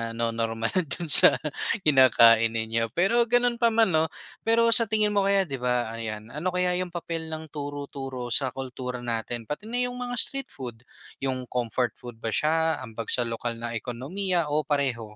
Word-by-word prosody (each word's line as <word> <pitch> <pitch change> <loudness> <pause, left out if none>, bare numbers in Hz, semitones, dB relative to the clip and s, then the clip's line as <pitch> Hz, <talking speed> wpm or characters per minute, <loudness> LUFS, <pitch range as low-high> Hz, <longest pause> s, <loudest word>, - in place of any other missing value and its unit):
no-normal 115 -1 -1
do'n 170 -2 -1
sa - - +9 0.5
kinakain 115 -5 +5
ninyo. 115 +1 0
Pero, 230 +7 +2
gano'n 245 0 +2
pa 235 - +4
man, 225 -4 +3
'no, 160 0 +3 0.4
pero 230 0 +4
sa 230 -1 +4
tingin 215 -1 +2
mo 200 -1 +1
kaya, 200 -1 +3
'di 135 -7 -6
ba, 125 -2 -1
ayan, 110 -1 -6
ano 150 +6 -4
kaya 180 0 +1
'yong 180 -1 -4
papel 165 -1 -4
ng 160 -1 -7
turo-turo 140 -4 -6
sa 135 +1 +3
kultura 125 -1 -6
natin, 115 0 -3
pati 150 - -6
na 245 +2 -1
'yong 250 0 -4
mga 245 0 -4
street 275 +2 -1
food, 120 -5 -8 0.4
'yong 130 -1 -2
comfort 125 0 -1
food 120 -2 -10
ba 115 - -2
siya, 160 +2 +1
ambag 115 -3 -6
sa 120 -2 +2
lokal 115 0 -4
na 115 0 -4
ekonomiya, 160 - -2
o 150 +1 0
pareho? 140 -5 -1
140 Hz, 180 wpm, -26 LUFS, 120-180 Hz, 0.5 s, sa